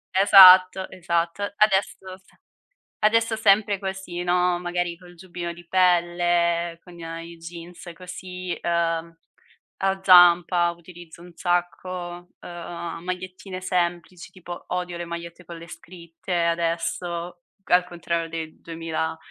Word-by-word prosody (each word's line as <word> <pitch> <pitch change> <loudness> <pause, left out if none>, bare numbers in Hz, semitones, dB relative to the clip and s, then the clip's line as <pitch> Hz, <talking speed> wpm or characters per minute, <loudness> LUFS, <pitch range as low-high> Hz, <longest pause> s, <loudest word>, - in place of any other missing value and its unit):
Esatto, 190 -1 +8
esatto. 170 +1 -2 0.2
Adesso 190 -2 0
se 190 - -28 0.6
adesso 225 +1 +2
sempre 205 -1 +3
così, 190 -2 -5
no, 180 0 +1
magari 175 -1 -3
col 180 -1 -16
giubbino 175 -1 -7
di 175 0 -15
pelle, 175 -1 +1
con 175 -1 -15
i 165 - -9
a 165 0 -6
i 170 0 -11
jeans 170 +1 -10
così, 180 0 -7
uhm, 170 -1 -1 0.6
a 195 0 -1
zampa, 175 -1 +6
utilizzo 170 0 -14
un 175 - -14
sacco, 175 +1 -2 0.5
uhm, 170 -1 -7
magliettine 185 +1 -6
semplici, 175 -1 -3
tipo 175 -1 -10
odio 180 -1 -3
le 175 - -4
magliette 170 +1 -8
con 170 - -9
le 170 - -12
scritte 170 0 -9
adesso, 170 +1 -2 0.2
al 180 0 +3
contrario 170 -1 -3
del 160 -1 -7
2000, 165 -1 -4
175 Hz, 125 wpm, -24 LUFS, 170-185 Hz, 0.6 s, Esatto